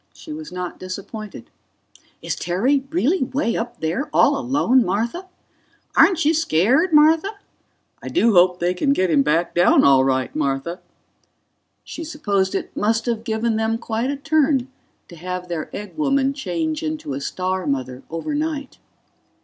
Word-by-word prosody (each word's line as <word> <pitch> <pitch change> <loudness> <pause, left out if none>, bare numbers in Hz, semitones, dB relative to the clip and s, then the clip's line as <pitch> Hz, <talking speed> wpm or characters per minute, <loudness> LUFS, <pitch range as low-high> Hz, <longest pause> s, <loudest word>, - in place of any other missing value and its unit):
She 310 - -9
was 310 0 -8
not 180 -1 -6
disappointed. 195 - -8 0.7
"Is - - -2
Terry 250 - 0
really 335 +3 +1
way 260 -2 -1
up 240 +1 -5
there 170 - -2
all 285 - +4
alone, 260 -1 +2
Martha?" 230 - -2 0.7
"Aren't 340 -5 +5
you 310 - +4
scared, 300 - +2
Martha?" 315 +4 +5 0.7
"I - - -8
do 235 -9 +2
hope 180 0 +5
they 175 +1 +1
can 275 +10 +1
get 185 -7 +1
him 145 -3 +4
back 165 +4 +1
down 175 +1 +4
all 135 -1 +5
right, 130 -1 0
Martha." 145 +4 -2 1.0
She 330 - -7
supposed 205 - -1
it - - -4
must 225 +2 0
have 230 -2 -2
given 225 0 -1
them 220 0 0
quite 230 +2 -2
a 285 - -2
turn 285 -3 +1 0.4
to 170 - -12
have 180 +1 -5
their 165 -3 -4
egg 210 0 -8
woman 275 -2 +1
change 170 - -3
into 155 -2 -4
a 135 - -4
star 185 +4 -3
mother 130 -2 -3
overnight. 290 - -3
220 Hz, 155 wpm, -21 LUFS, 175-280 Hz, 1.0 s, Aren't